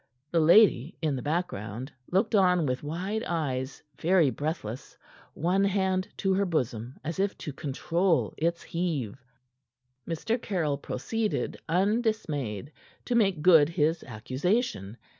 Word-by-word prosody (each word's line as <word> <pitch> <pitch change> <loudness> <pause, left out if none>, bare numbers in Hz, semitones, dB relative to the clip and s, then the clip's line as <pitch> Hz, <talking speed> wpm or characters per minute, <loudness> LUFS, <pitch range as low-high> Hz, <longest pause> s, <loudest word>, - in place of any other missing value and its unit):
The 170 - +3
lady, 165 - +5
in 150 -3 +1
the 130 - -4
background, 135 - -3 0.2
looked 205 +5 +2
on 180 -5 +4
with 125 -1 -1
wide 185 +9 -3
eyes, 135 -5 -3 0.2
very 170 -5 +4
breathless, 145 -6 -5 0.4
one 180 +5 +1
hand 190 -1 +1
to 195 -1 +1
her 200 +1 +2
bosom 125 -6 -2
as 165 +4 -4
if 200 0 0
to 150 - -6
control 165 +6 0
its 170 +2 -1
heave. 145 - -3 0.9
Mr. 220 +8 -1
Caryll 155 -8 -1
proceeded, 215 - -2
undismayed, 170 - 0 0.3
to 245 - -1
make 195 -9 +2
good 160 -4 +7
his 165 -1 +1
accusation. 130 - -2
165 Hz, 125 wpm, -28 LUFS, 140-190 Hz, 0.9 s, good